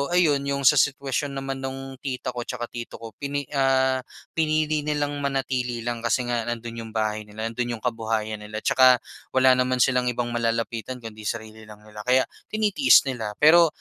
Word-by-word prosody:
ayun, 155 -6 +4
yung 140 0 -1
sa 140 +2 +6
sitwasyon 140 +1 0
naman 135 0 -4
nung 135 0 -6
tita 130 -2 -4
ko 120 -1 -6
'tsaka 120 -1 -5
tito 120 -1 -7
ko, 115 -1 -9
pini 145 0 -2
ah, 130 -1 +2 0.3
pinili 155 -1 +1
nilang 145 -1 -2
manatili 130 -4 -2
lang 120 -1 -2
kasi 115 +2 0
nga 120 -1 -2
nandun 115 -1 -5
yung - - -11
bahay 110 -1 -1
nila, 110 +2 -5
nandun 120 +1 -2
yung 110 - -13
kabuhayan 110 -2 -2
nila. 105 +1 -7
'Tsaka 130 -1 +6 0.4
wala 130 -1 +5
naman 125 -1 +3
silang 125 -1 +1
ibang 120 0 -1
malalapitan 115 +1 -2
kundi 110 -2 -7
sarili 110 -1 -6
lang 105 0 -13
nila, 105 0 -12
kaya 130 +1 +5 0.2
tinitiis 215 +5 +4
nila. 115 -6 -4
Pero 165 +3 +7
125 Hz, 180 wpm, -24 LUFS, 115-135 Hz, 0.4 s, Pero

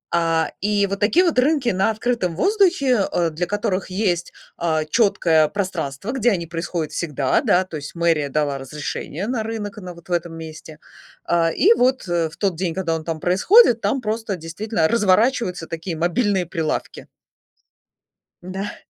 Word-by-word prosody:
А, 165 -1 +1
и 205 0 +2
вот 200 0 -4
такие 315 - +3
вот 325 -7 +2
рынки 270 -2 +2
на 190 0 +1
открытом 220 -6 -1
воздухе, 340 - +2
э, 170 -1 +1
для 170 +3 -3
которых 205 -2 -2
есть, 185 -3 -1 0.3
а, 160 -2 0
четкое 165 -5 +3
пространство, 185 - -3
где 245 -3 +2
они 170 -4 -1
происходят 165 -1 -4
всегда, 145 -6 0
да, 180 - +3
то 170 -4 -7
есть 145 +3 -8
мэрия 165 -4 +1
дала 145 -1 -1
разрешение 150 +5 -5
на 245 -2 -1
рынок, 215 -1 -5
на 185 -3 -8
вот 170 +1 -17
в - - -8
этом 170 -1 -1
месте. 160 -1 -10 0.5
А, 170 -1 +2
и 410 - +5
вот, 260 - +1
э, 170 -2 0
в 155 - -16
тот 195 -4 0
день, 170 -1 -2
когда 170 -4 -1
он 160 - -5
там 160 -1 -4
происходит, 235 - +5
там 270 - 0
просто 220 -2 -2
действительно 165 +2 -2
разворачиваются 210 -3 +2
такие 165 0 -5
мобильные 180 +2 +1
прилавки. 160 -2 -4 1.4
Да. 190 +3 -5
180 Hz, 165 wpm, -21 LUFS, 165-215 Hz, 1.4 s, и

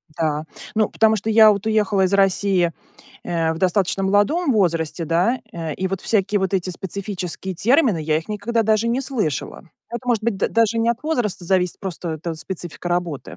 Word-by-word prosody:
Да, 155 -1 -1 0.3
ну 215 -1 +2
потому, 220 0 +3
что 210 +3 -3
я 220 -1 +7
вот 200 0 -2
уехала 210 -3 +2
из 185 - -1
России, 195 -2 +2 0.5
э, 165 -2 0
в 160 - -6
достаточно 185 +1 +1
молодом 205 - +2
возрасте, 165 -5 0
да. 175 - +1
Э, 165 -3 -4
и 190 - -2
вот 195 0 -3
всякие 205 -1 +1
вот 190 0 -1
эти 185 -1 -1
специфические 190 0 -5
термины 235 - +3
я 155 0 +1
их 160 - -10
никогда 225 +2 -1
даже 220 +1 +2
не 240 +3 0
слышала. 230 - -3 0.3
Это 235 +1 -6
может 230 -3 +1
быть 230 -4 0
д - - 0
даже 230 0 +2
не 225 +1 +1
от 235 0 -4
возраста 240 - -1
зависит, 180 0 +1
просто 180 -3 -5
это 165 +2 -5
специфика 175 +1 -6
работы. 165 - -3
195 Hz, 190 wpm, -21 LUFS, 175-220 Hz, 0.5 s, я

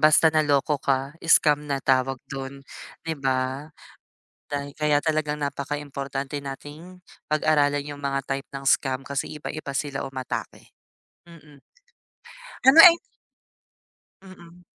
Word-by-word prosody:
basta 155 +1 +5
naloko 145 -1 +1
ka, 135 +1 -1 0.2
scam 150 -2 +4
na 140 - 0
tawag 130 0 +2 0.2
do'n, 135 0 -7 0.4
'di 160 -3 -4
ba? 130 +2 -1 0.8
Day 140 0 -4
kaya 150 -1 +2
talagang 155 -1 -1
napakaimportante 140 -1 -4
nating, 145 +6 -9 0.3
pag-aralan 145 -2 +2
yung 145 - -13
mga 140 -1 -2
type 135 0 -4
ng 135 0 -8
scam, 135 -1 +1
kasi 140 +2 -4
iba-iba 155 -1 -6
sila 140 0 -3
umatake, 130 -2 -6 0.5
mm. 150 -4 -16 1.1
Ano, 275 +5 +9
ay 340 0 +10 1.3
Mm. 180 -2 -15
145 Hz, 115 wpm, -24 LUFS, 135-155 Hz, 1.3 s, ay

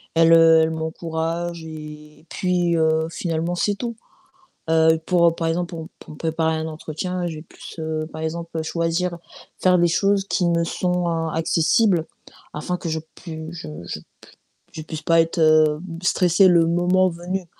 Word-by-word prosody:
elle, 165 0 +6
heu, 165 -1 +7
elle 160 - 0
m'encourage 165 +1 -3
et 150 -1 -10
puis, 180 -2 0
heu, 160 0 +2
finalement, 165 0 -2
c'est 205 +4 0
tout. 235 +2 -5 0.7
Heu 160 0 +4
pour 170 -2 +3
par 165 - -2
exemple, 175 +2 -1
pour 160 -1 -6
pour - - -13
me - - -13
préparer 160 0 0
à - - -2
un 160 - -3
entretien, 165 +3 -4
j'ai 155 -2 -6
plus, - - -12
heu, 155 0 -3
par 155 - -7
exemple 165 0 -4
choisir 170 +2 -1 0.4
faire 180 -1 +4
des 175 - +4
choses 195 +2 +2
qui 180 - +1
me 170 -1 +2
sont 180 0 -1 0.2
accessibles 165 +3 +2 0.5
afin 180 +4 -3
que 170 - -6
je 160 0 -1 0.2
pui 160 -2 -8
je 170 - -8 0.2
je - - -5
p - - -24 0.7
je 160 - -6
puisse 160 -1 -7
pas 165 0 +4
être 165 +1 -2 0.6
stressée 180 +1 +4
le 170 -2 +5
moment 180 +2 +3
venu, 175 +2 -4
165 Hz, 165 wpm, -22 LUFS, 160-175 Hz, 0.7 s, heu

